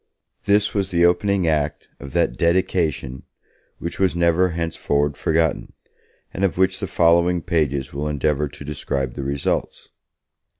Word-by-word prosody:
This 105 +1 +2
was 100 -2 -1
the 85 0 +3
opening 95 +2 +2
act 75 -2 -1
of 70 -1 -9
that - - +1
'dedication' 85 -6 0 0.6
which 85 - -6
was 95 -3 +2
never 85 +1 +3
henceforward 75 -3 -1
forgotten, 80 +1 0 0.6
and 95 - -3
of 95 -3 +1
which 95 0 +2
the - - -3
following 85 +1 +3
pages 70 -5 -1
will 70 +2 -3
endeavour 75 0 0
to 70 0 -11
describe 70 -3 -3
the 70 - -5
results. 70 +1 -2
80 Hz, 140 wpm, -22 LUFS, 70-90 Hz, 0.6 s, the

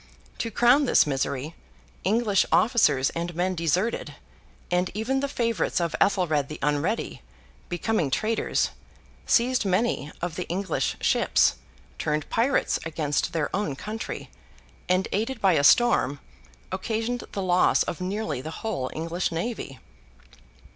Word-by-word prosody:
To 230 - -1
crown 245 +6 +4
this - - +5
misery, 140 +1 -2 0.5
English 205 0 +3
officers 150 - +3
and 170 0 -4
men 180 +2 0
deserted, 180 +6 -1 0.6
and 180 +1 +1
even 245 +6 0
the 280 - -1
favourites 230 - 0
of 170 -2 -1
Ethelred 160 -8 +2
the 155 - -7
Unready, 150 +9 -1 0.5
becoming 175 -2 0
traitors, 215 +10 0 0.6
seized 250 +1 +3
many 190 -6 0
of 170 -2 -4
the 180 - -3
English 185 0 -1
ships, - - +3 0.4
turned 150 0 -1
pirates 245 +5 +1
against 155 -1 -1
their 160 0 -1
own 195 -9 -1
country, 215 +9 -6 0.6
and 185 +1 +2
aided 230 +4 -1
by 195 -3 +4
a 145 -3 +2
storm 145 - +4 0.5
occasioned 225 +5 -2
the 195 - -2
loss 180 -1 +3
of 175 - -5
nearly 195 - -2
the 155 - -6 0.2
whole 155 -13 -2
English 165 +3 -2
navy. 165 - -4
185 Hz, 130 wpm, -26 LUFS, 160-225 Hz, 0.6 s, this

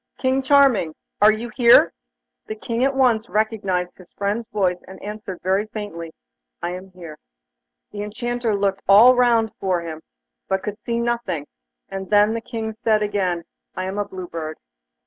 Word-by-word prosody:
King 260 +1 +1
Charming! 265 - +4 0.3
Are 210 +1 +8
you 225 +3 -4
here?' 240 -2 +6 0.5
The 215 - -4
King 230 +2 -2
at 270 0 +1
once 240 -4 +2
recognised 200 -5 -1
his 180 - -16
friend's 205 +3 -2
voice, 185 -4 0
and 190 - -11
answered 210 -3 -7
very 190 +3 +1
faintly: 205 -7 -7 0.5
'I 175 - -1
am 185 +2 -8
here.' 170 -4 -11 0.7
The 205 - -6
Enchanter 235 +1 -2
looked 195 -1 0
all 220 +6 +9
round 235 -3 +3
him, 170 -4 -2 0.5
but 190 0 -1
could 210 +1 -5
see 235 -1 -3
nothing, 235 -10 -2 0.4
and 190 -1 -6
then 210 +1 +4
the 230 - -3
King 225 -2 -5
said 215 -1 +1
again: 185 -4 -1 0.3
'I 185 - -3
am 190 +2 -4
a 205 - 0
Blue 185 -2 -8
Bird. 155 -2 -6
210 Hz, 165 wpm, -22 LUFS, 185-230 Hz, 0.7 s, all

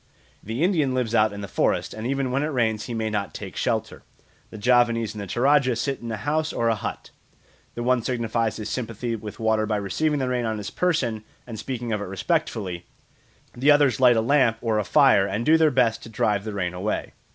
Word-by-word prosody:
The 115 +8 -3
Indian 155 -8 +2
lives 120 -3 -1
out 110 -2 +4
in 100 0 -7
the 100 - -5
forest, - - 0
and 110 +2 -5
even 135 -1 -1
when 135 +2 0
it 150 - 0
rains 110 -7 0
he 120 - -5
may 110 -1 -2
not 105 -1 -3
take - - -7
shelter; - - -2 0.5
the - - -10
Javanese 115 -1 +2
and 105 - -7
the 100 - -6
Toradja 130 +2 +3
sit 135 +4 -2
in 115 -1 -5
a 110 - -3
house 150 +7 -1
or 115 0 0
a - - +3
hut. 105 - -6 0.6
The 120 - -4
one 125 0 +2
signifies 115 -2 -1
his 105 -1 -5
sympathy 115 -1 -3
with 105 -1 -8
water 110 -1 +1
by 105 -1 0
receiving 145 +10 0
the 130 -2 -1
rain 125 -1 -1
on 110 -1 -2
his 105 - -6
person 125 -12 0 0.2
and 115 -3 -7
speaking 120 -3 -4
of 105 - -2
it - - -3
respectfully; 95 - -2 0.7
the 135 +5 +1
others 145 -6 +4
light 125 -2 +6
a - - +3
lamp 125 -2 +3
or 110 -2 0
a - - 0
fire 130 -7 +4
and 105 +4 -2
do 160 - +6
their 160 -1 +5
best 120 -4 +1
to 115 - -10
drive 105 -2 0
the 110 - -4
rain 90 -3 -2
away. 95 +4 -3
115 Hz, 225 wpm, -24 LUFS, 110-130 Hz, 0.7 s, light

